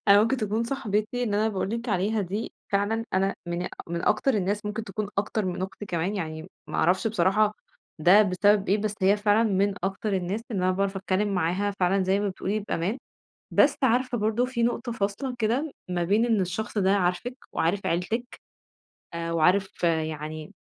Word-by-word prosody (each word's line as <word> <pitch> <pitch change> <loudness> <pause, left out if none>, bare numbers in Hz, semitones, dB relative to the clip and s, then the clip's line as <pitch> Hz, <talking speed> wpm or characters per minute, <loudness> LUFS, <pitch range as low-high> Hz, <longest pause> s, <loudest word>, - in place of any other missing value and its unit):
أنا 200 +1 +8
ممكن 230 +5 +1
تكون 220 -1 -1
صاحبتي 230 -2 -1
إن 215 -4 0
أنا 215 +2 +2
باقول 195 -2 -2
لك 230 +2 -3
عليها 210 +2 +1
دي 200 +4 -3 0.2
فعلًا 205 +3 +1
أنا 195 +1 +2
من 175 +1 -2 0.2
من 170 0 -3
أكتر 235 +5 +2
الناس 205 +1 -1
ممكن 215 +1 -3
تكون 215 -2 -4
أكتر 210 +1 0
من 180 0 -2
أختي 190 +2 -6
كمان، 175 +2 -1
يعني 160 -1 -5 0.2
ما - - -5
أعرفش 185 +5 +2
بصراحة 210 +1 +2 0.4
ده 180 +7 +7
بسبب 205 +1 +2
إيه؟ 200 +3 +3
بس 210 0 -2
هي 195 +2 +5
فعلًا 210 +2 +3
من 200 0 +1
أكتر 195 +2 -2
الناس 190 +3 -1
اللي 190 -5 -1
أنا 185 - +3
باعرف 195 +1 -1
أتكلّم 195 +2 0
معاها 180 +3 0
فعلًا 190 +2 +3
زي 190 +2 +2
ما 205 - 0
بتقولي 195 +2 -2
بأمان، 200 +2 -2 0.5
بس - - +4
عارفة 255 0 +2
برضه 220 +3 +1
في 250 -2 -2
نقطة 240 +1 0
فاصلة، 220 +5 -2
كده 250 +7 0 0.2
ما 175 -1 -1
بين 205 +6 +3
إن 225 -4 +2
الشخص 200 +4 -2
ده 190 -1 +3
عارفِك 185 +7 -1 0.2
وعارف 185 +5 0
عيلتِك 220 +9 -2 0.7
آآ 165 0 -3
وعارف 180 +5 +2
يعني 155 -2 -2
200 Hz, 185 wpm, -26 LUFS, 185-220 Hz, 0.7 s, أنا